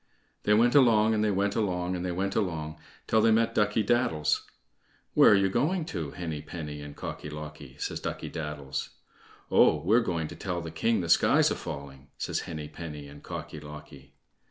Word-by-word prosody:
They 105 - +5
went 120 +3 +4
along, 110 -5 +5
and 105 -1 +1
they 105 - +2
went 100 0 0
along, 90 -4 0
and 90 - -3
they 90 - -1
went 95 +3 -2
along 80 -7 -2 0.3
till 110 - +3
they 115 - +5
met 115 +1 +3
Ducky 105 0 +2
daddles. 85 - +1 0.7
"Where - - +7
are - - +7
you 100 -1 +3
going 155 - 0
to, 80 -3 -3
Henny 80 -2 -5
penny 75 -2 -7
and 75 0 -9
Cocky 75 - -6
locky?" 75 -3 -9
says - - -3
Ducky - - -4
daddles. 75 -4 -4 0.6
"Oh! - - +6
we're 110 +7 +5
going 85 -7 -2
to - - -8
tell 90 -3 -3
the 80 -1 -6
king 110 +7 +1
the 85 - -3
sky's - - +5
a - - 0
falling," 70 -1 -8
says - - -2
Henny 75 -3 -5
penny 75 -2 -8
and 70 +1 -12
Cocky 75 - -7
locky. 75 -2 -12
85 Hz, 190 wpm, -28 LUFS, 75-105 Hz, 0.7 s, Where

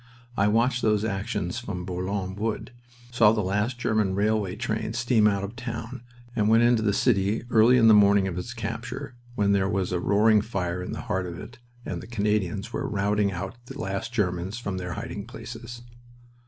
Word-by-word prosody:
I 100 -1 +3
watched 120 +4 +2
those 105 -1 +2
actions 95 -3 -2
from 90 -1 -5
Bourlon 95 +1 -3
Wood, 110 +4 -3 0.4
saw 115 -3 +5
the 105 -2 0
last 105 +6 -1
German 110 -5 +1
railway 105 -2 +1
train 110 0 -2
steam 115 -2 +3
out 100 -1 +1
of 100 - -4
the 120 - -19
town, 115 0 -5 0.3
and 105 -2 +2
went 115 +1 +5
into 120 -1 +4
the 105 -2 +2
city 100 -1 +1
early 115 +3 +6
on 115 -2 +5
the 110 - +8
morning 100 -1 +5
of 90 - -3
its 105 +8 -5
capture, 120 +4 -5 0.2
when 100 -3 +2
there 95 -1 +2
was 95 -3 -1
a 90 - 0
roaring 105 +3 +4
fire 90 -5 -3
in 90 - -5
the - - -4
heart 95 -1 -2
of 85 -1 -7
it 125 +8 -10 0.3
and 85 -2 -4
the - - -10
Canadians 105 -1 -1
were 140 -1 -2
routing 100 -1 +1
out 95 +6 -6
the - - -9
last 100 +4 -3
Germans 95 -2 -1
from 100 -6 -4
their 90 -1 -4
hiding - - -6
places. 120 +1 -9
105 Hz, 195 wpm, -26 LUFS, 95-115 Hz, 0.4 s, the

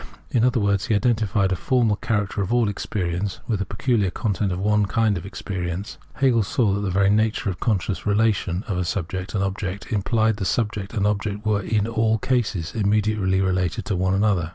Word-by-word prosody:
In 115 - +2
other 125 0 +3
words, 100 -2 +1
he 110 - +2
identified 105 -3 +1
a - - +2
formal 120 0 +2
character 105 -2 -1
of 100 - -2
all 120 -2 +3
experience 95 -2 -3
with 110 -6 0
the 100 - -2
peculiar 105 0 +1
content 100 -1 -1
of 90 - -2
one 105 +1 +2
kind 110 -1 +2
of 85 +1 -5
experience. 95 -1 -5 0.2
Hegel 130 -5 +3
saw 105 0 +1
that 100 - 0
the 100 - -1
very 100 +2 +3
nature 110 -1 +1
of 90 - -7
the - - -6
conscious 100 -4 0
relation 105 -3 +1
of 90 -4 -1
subject 95 +2 -3
and 100 - +1
object 95 +1 -4
implied 110 +1 +1
that 100 - -3
subject 105 +2 -1
and 100 -2 +1
object 105 0 -1
were 105 -1 +2
in 105 +1 0
all 110 -1 +1
cases 110 -8 -1
immediately 105 -2 +1
related 90 -2 0
to 100 - -1
one 95 +1 +1
another. 95 -5 +1
100 Hz, 200 wpm, -23 LUFS, 95-110 Hz, 0.2 s, other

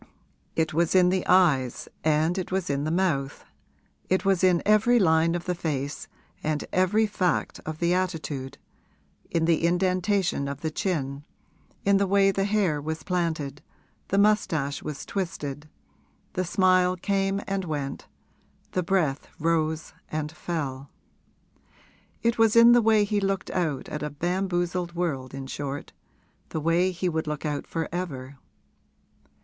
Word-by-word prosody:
It 160 -1 0
was 170 +3 +1
in 180 -1 +6
the 185 0 +1
eyes 150 -9 +3 0.2
and 155 +2 +2
it 185 - -5
was 185 -4 -1
in 140 +1 -1
the - - 0
mouth, 155 -6 -1 0.6
it 185 +1 +1
was 195 -2 +2
in 180 -2 +4
every 215 +4 +4
line 165 -4 +3
of 175 - -4
the 180 - 0
face 145 -4 -3 0.3
and 155 -1 -1
every 195 +4 +3
fact 185 -5 -1
of 155 -1 -4
the 170 +2 +1
attitude, 155 -7 -2 0.7
in 165 -1 +1
the 165 -1 +2
indentation 185 -2 +1
of 140 0 -5
the 160 - -2
chin, 150 -7 -2 0.6
in 200 0 +5
the 200 0 +1
way 195 0 +4
the 195 0 0
hair 200 -8 +1
was 160 +2 -4
planted, 160 -6 -2 0.5
the 195 - 0
moustache 170 -9 +2
was 150 -3 -6
twisted, 150 -6 -4 0.6
the 185 - -1
smile 185 0 +3
came 195 +1 0
and 195 -1 -2
went, 145 -4 -4 0.6
the 185 - 0
breath 170 -6 0
rose 160 -1 0 0.2
and 155 -1 -3
fell. 145 -5 -4 1.3
It 235 0 +1
was 225 -1 +4
in 230 +1 +8
the 240 0 +6
way 220 -1 +4
he 205 0 0
looked 195 -1 -1
out 160 -7 -1
at 150 - -5
a 150 - -2
bamboozled 175 +2 -1
world 135 -7 -2
in 135 0 -6
short 140 +1 -5 0.6
the 160 - -3
way 165 +4 +2
he 185 0 -2
would 160 -2 -1
look 150 0 -4
out 145 -1 -3
for 165 -1 -2
ever. 140 -7 -5
170 Hz, 150 wpm, -26 LUFS, 150-190 Hz, 1.3 s, in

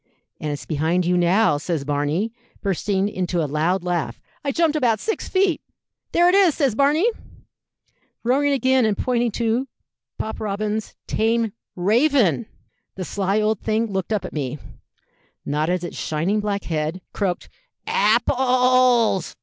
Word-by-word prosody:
'And 150 - -3
it's 145 - -5
behind 165 +3 0
you 180 +1 +2
now,' 175 -2 +3
says 155 -2 -3
Barney, 145 +10 -1 0.3
bursting 195 0 0
into 180 -3 -2
a 160 - +1
loud 160 +6 0
laugh. 170 -10 -2 0.2
I 280 - 0
jumped 320 +1 +2
about 240 -7 +2
six 440 - -3
feet. 375 -3 +2 0.5
'There 345 +1 +4
it 360 - +4
is,' 385 -6 +5
says 275 -7 +1
Barney, 285 - +3 1.2
roaring 275 +4 +2
again, 260 -1 +3
and 215 -3 +1
pointing 240 -1 +1
to 235 +3 0 0.5
Pop 220 - -4
Robins's 215 +1 -3
tame 225 -1 0 0.2
raven! 225 - +2 0.5
The 185 - -5
sly 200 +2 0
old 215 -1 0
thing 220 0 0
looked 190 +2 -2
up 210 -3 0
at - - -7
me, 145 -2 -3 0.9
nodded 155 +5 0
its 175 - -6
shining 170 +7 0
black 205 -1 -2
head, 160 +2 -2
croaked 190 -4 -2 0.4
'Apples!' 250 -1 +3
210 Hz, 140 wpm, -22 LUFS, 175-250 Hz, 1.2 s, is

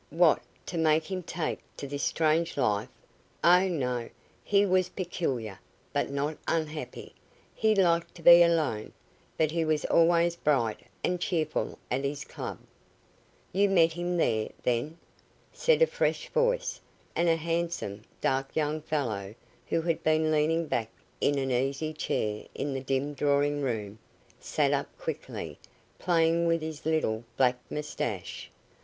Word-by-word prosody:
"What, 165 0 +4 0.2
to 170 - -3
make 160 +2 +2
him 185 -1 -2
take 170 -1 -3 0.2
to - - -5
this 140 +1 -4
strange 160 +1 +1
life? 105 -6 +1 0.5
Oh, 180 +2 +6
no. 125 -9 -2 0.3
He 205 0 +3
was 185 -1 +2
peculiar, 135 - -3 0.3
but - - 0
not 145 +2 -2
unhappy. 155 -2 -3 0.4
He 220 -1 +2
liked 170 -3 +2
to 170 - -13
be 175 +1 +10
alone, 155 -11 +2 0.4
but 155 -1 +2
he 165 0 0
was 155 -1 0
always 170 0 +4
bright 130 -9 +1 0.2
and 180 -1 0
cheerful 160 -4 -1
at 130 +2 0
his 140 0 -3
club." - - -6 1.0
"You 200 +2 +3
met 165 -4 +4
him 175 +1 -2
there, 110 -9 +1
then?" 125 +7 0 0.6
said 485 0 +4
a - - +8
fresh 485 +1 -1
voice, - - 0 0.3
and 170 0 +2
a 165 - +4
handsome, 165 -10 -2 0.2
dark 135 0 0
young 155 0 0
fellow, 110 -10 -2 0.3
who 165 - 0
had 165 -1 0
been 155 0 +3
leaning 160 +2 +2
back 115 -7 -1 0.3
in 145 - +2
an 135 -1 -1
easy 135 +5 0
chair 105 -8 -2
in 140 0 -2
the 135 - -3
dim 135 +2 -1
drawing 145 +1 +1
room, 110 -5 -3 0.4
sat - - +1
up - - 0
quickly, - - -6 0.4
playing 170 -1 +2
with 165 -1 +1
his 155 -1 -5
little 120 -8 0
black 125 -1 +3
moustache. 120 - -4
155 Hz, 145 wpm, -29 LUFS, 135-170 Hz, 1.0 s, be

